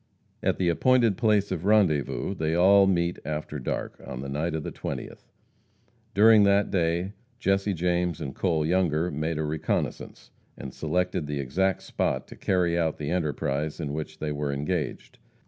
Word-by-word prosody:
At - - +1
the 90 - 0
appointed 115 +4 +3
place 105 -3 +2
of 85 -3 -3
rendezvous 95 -5 +2
they 80 -3 -1
all 95 +3 +6
meet 85 -2 +1
after 75 -1 -4
dark, 65 - -4
on 65 - -6
the 70 - -6
night 75 +4 -2
of 80 - -3
the - - -5
twentieth. - - -7 0.9
During 110 +1 +7
that 100 0 +3
day 90 +2 0 0.2
Jesse 100 -2 +1
James 90 -1 0
and 65 - -5
Cole 80 -5 0
Younger 85 -1 +1
made 80 +2 -2
a 80 - -1
reconnoissance, 75 0 -3 0.3
and 65 - -8
selected 90 -3 -1
the 75 -1 -3
exact 90 +9 0
spot - - -2
to - - -10
carry 90 -2 +1
out 80 -2 0
the 75 0 -4
enterprise 75 -3 -1
in 75 -3 -3
which 75 0 -5
they 75 -1 -3
were 75 -1 -2
engaged. 75 +2 -3
85 Hz, 165 wpm, -26 LUFS, 75-95 Hz, 0.9 s, During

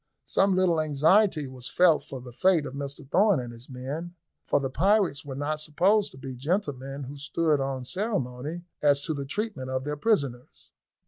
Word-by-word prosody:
Some 195 -1 +2
little 180 -4 +3
anxiety 155 +2 +3
was 130 -1 -6
felt 175 -3 +4
for 135 - -8
the 125 -1 -11
fate 180 +1 +3
of - - -6
Mr 140 +1 -6
Thorn 195 +2 +4
and 120 -1 -6
his 120 +3 -11
men, 145 +7 -6 0.3
for - - +3
the 135 -1 -3
pirates 190 -2 +2
were 135 -2 -7
not 150 +2 -2
supposed 190 +8 +2
to - - -13
be 130 -1 -7
gentlemen 140 -2 -2
who 140 +2 -8
stood 150 +1 +1
on 135 -2 -3
ceremony 155 - -3 0.2
as 145 -1 +4
to 160 - -1
the 140 -2 -4
treatment 180 - -3
of 130 0 -2
their 150 +1 -3
prisoners. 140 - -1
145 Hz, 185 wpm, -27 LUFS, 135-180 Hz, 0.3 s, felt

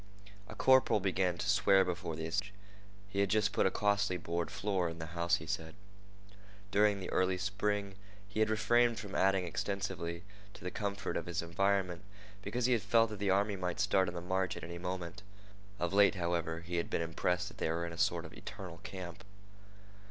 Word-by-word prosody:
A - - -9
corporal 130 -4 +5
began 95 -2 +1
to 90 - -3
swear 95 -1 +5
before 90 -2 -3
the 80 0 -4
assemblage. 95 +4 -2 0.5
He 100 0 -3
had 100 -1 +3
just 105 -1 +2
put - - +3
a - - +3
costly 100 -2 +1
board 85 0 -2
floor 95 -4 -1
in 80 0 -8
his 80 -1 -6
house, 85 +1 +1
he 80 - -6
said. 80 +2 -4 1.0
During 105 0 +4
the 95 - -5
early 95 0 +2
spring 100 +1 -1 0.3
he 100 +2 -5
had 110 0 +3
refrained 120 +2 +3
from 100 -4 -7
adding 95 -1 +3
extensively 90 -2 -3 0.3
to - - -12
the 90 - -3
comfort 100 -1 -2
of 85 - -4
his 85 -1 -2
environment 90 +1 0 0.4
because 120 +3 -1
he 125 - +4
had 115 - +2
felt 115 0 +3
that 105 - -6
the 100 -1 0
army 100 +2 +2
might 90 -1 -3
start 100 -2 +3
on 90 - -4
the 85 - -4
march 95 +1 -1
at - - -8
any 85 +1 -6
moment. 90 +1 -4 0.6
Of 90 -1 -1
late, 100 0 +6
however, 85 -2 -1
he 85 +1 -4
had 85 - -1
been 85 - 0
impressed 90 +4 -1
that - - -15
they - - 0
were 85 +1 -1
in 85 - -6
a - - -8
sort - - +1
of - - -10
eternal 95 -5 -8
camp. 90 0 -8
95 Hz, 205 wpm, -33 LUFS, 85-100 Hz, 1.0 s, late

